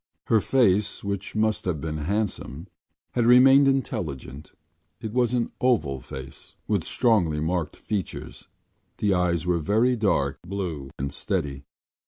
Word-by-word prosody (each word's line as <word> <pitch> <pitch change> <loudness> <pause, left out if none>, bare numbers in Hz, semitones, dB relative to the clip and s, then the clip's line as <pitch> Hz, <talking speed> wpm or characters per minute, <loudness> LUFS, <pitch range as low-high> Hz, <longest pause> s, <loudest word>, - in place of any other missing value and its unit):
Her 110 -2 +3
face, 105 -5 +2
which 100 0 -4
must 110 -1 +1
have 90 -5 -1
been 75 0 -4
handsome, 90 -3 -3 0.5
had 120 -1 +1
remained 135 +3 +7
intelligent. 75 - -3 0.5
It 110 -1 -6
was 125 0 +2
an 120 -1 -1
oval 80 - +1
face 65 +3 -10
with 100 -6 +1
strongly 95 -10 +2
marked 80 0 -2
features. 100 -5 -5 0.5
The 105 -2 +1
eyes 90 -2 +1
were 90 -1 +1
very 110 +9 +2
dark 105 -4 0
blue 85 -7 -5
and 70 +1 -3
steady. 70 -1 -3
95 Hz, 135 wpm, -25 LUFS, 75-110 Hz, 0.5 s, remained